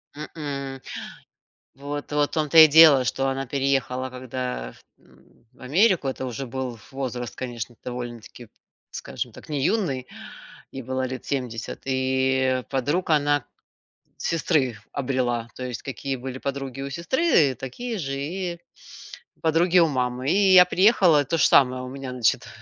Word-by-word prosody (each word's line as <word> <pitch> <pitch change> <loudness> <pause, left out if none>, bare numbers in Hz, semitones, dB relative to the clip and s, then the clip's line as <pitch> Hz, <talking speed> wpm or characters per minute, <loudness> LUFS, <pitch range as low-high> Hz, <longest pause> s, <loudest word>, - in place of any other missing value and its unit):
М-м, 140 -3 -6 0.9
вот 145 +2 -6
вот 145 0 +1
в - - -34
том 155 -2 0
то 165 - +4
и 160 - +12
дело, 155 -3 +7
что 135 +2 -1
она 135 0 -2
переехала 135 -1 -1
когда 125 - -5 0.2
в - - -32
м, 115 - -25
в 130 - -25
Америку- 170 - +2
это 130 0 -4
уже 130 +2 -5
был 125 -1 -5
возраст, 125 -3 -4
конечно, 120 -1 -5
довольно-таки, 120 -1 -7 0.4
скажем - - -6
так, - - -14
не 145 -3 -2
юный. 145 - 0 0.7
Ей 135 - -5
было 130 +2 -3
лет 130 - -6
70. 125 -5 -4
И 130 -1 +1
подруг 145 +7 -1
она 145 -2 +2 0.7
сестры 150 -8 0
обрела. 125 -4 -1
То 130 - -7
есть, 125 -3 -5
какие 135 0 -4
были 130 0 -6
подруги 135 -1 -5
у 140 - -4
сестры, 170 - +2
такие 215 - -6
же 135 -5 -3
и 175 +3 -4 0.8
подруги 165 +3 +3
у 165 - +4
мамы. 125 -1 -1
И 195 0 +4
я 180 -1 +10
приехала, 180 -5 +4
тоже 160 +4 +2
самое, 130 -1 +4
у 130 - -6
меня, 135 -1 -7
значит, 125 -4 +1
135 Hz, 150 wpm, -24 LUFS, 125-150 Hz, 0.9 s, и